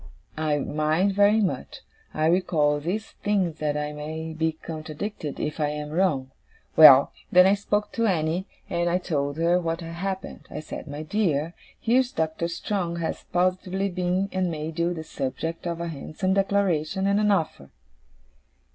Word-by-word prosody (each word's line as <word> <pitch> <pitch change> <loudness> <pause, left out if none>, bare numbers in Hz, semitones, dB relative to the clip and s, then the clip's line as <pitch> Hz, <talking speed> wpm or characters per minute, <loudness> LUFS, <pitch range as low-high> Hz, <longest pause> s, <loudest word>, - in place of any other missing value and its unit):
'I 155 -1 0
mind 155 +7 +1
very 205 +2 +4
much. 195 - -3 0.3
I 155 - 0
recall 155 -4 +2
these 190 +8 -3
things 190 -6 0
that 150 -1 -1
I 150 0 -3
may 160 +2 -5
be 160 0 0
contradicted 155 +1 -6
if 150 +1 -3
I 150 - +2
am 150 0 -5
wrong. 150 -7 +1 0.4
Well! 140 -3 +9 0.2
Then 180 0 +7
I 195 - +5
spoke 205 +1 -1
to 230 -1 0
Annie, 170 0 0 0.2
and 175 0 0
I 175 - +2
told 145 -5 -2
her 170 +2 +3
what 165 0 -2
had 165 0 -7
happened. 190 +2 -5
I 150 - -6
said, 155 - -8
"My 145 +1 -6
dear, 165 -3 0 0.3
here's 250 +2 +2
Doctor 160 +1 -1
Strong 170 0 -2
has 170 -1 -4
positively 185 +2 0
been 180 +1 0
and 185 -1 0
made 155 0 -5
you 170 +1 +2
the 160 -2 -4
subject 160 +4 -4
of 170 -1 -3
a 170 - -3
handsome 165 +5 -2
declaration 195 -3 +1
and 200 +1 +3
an 210 0 +2
offer." 160 - 0
170 Hz, 165 wpm, -25 LUFS, 155-190 Hz, 0.4 s, Well